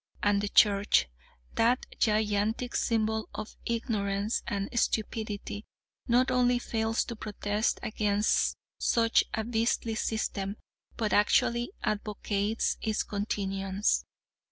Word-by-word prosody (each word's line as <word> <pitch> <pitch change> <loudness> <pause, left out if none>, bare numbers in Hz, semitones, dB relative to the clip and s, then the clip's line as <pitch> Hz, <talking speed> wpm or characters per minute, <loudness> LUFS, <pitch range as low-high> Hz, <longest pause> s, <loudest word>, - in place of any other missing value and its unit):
And 205 -1 +3
the 205 - -2
Church, 200 - +4 0.5
that 240 +2 +2
gigantic 215 +2 +1
symbol 220 -1 0
of 215 0 -6
ignorance 210 -3 -1
and 200 0 -2
stupidity, 215 -2 -2 0.4
not 250 +2 +3
only 250 -1 +3
fails 225 -1 0
to 235 - -6
protest 210 0 -1
against 210 -1 +1 0.2
such 230 -1 +3
a 220 - -1
beastly 230 0 0
system, 215 -3 -2 0.4
but 220 -3 0
actually 235 - +3
advocates 210 0 -1
its 220 -2 0
continuance. 195 -1 -1
215 Hz, 105 wpm, -29 LUFS, 205-230 Hz, 0.5 s, Church